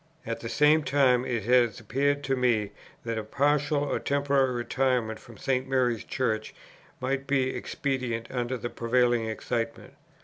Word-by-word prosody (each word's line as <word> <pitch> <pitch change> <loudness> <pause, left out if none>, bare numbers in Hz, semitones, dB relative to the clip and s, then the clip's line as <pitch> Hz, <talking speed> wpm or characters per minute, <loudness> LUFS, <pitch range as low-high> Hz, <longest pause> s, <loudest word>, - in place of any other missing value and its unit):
At 115 0 -3
the 115 - -6
same 150 +4 +4
time 130 -4 +3
it 120 -5 -2
has 120 -1 +3
appeared 140 +6 0
to 135 -1 0
me 115 -5 +1 0.3
that 115 -1 -2
a - - -4
partial 145 +5 +1
or 145 - -1
temporary 140 -2 +1
retirement 120 -2 0
from 115 -3 -14
St. 130 +2 -1
Mary's 125 -4 +1
Church 110 -4 -2 0.4
might 135 +1 -2
be 135 -2 +1
expedient 125 -5 -2
under 125 0 -2
the 120 +1 -5
prevailing 120 -1 +1
excitement. 115 +1 -3
125 Hz, 150 wpm, -27 LUFS, 115-135 Hz, 0.4 s, same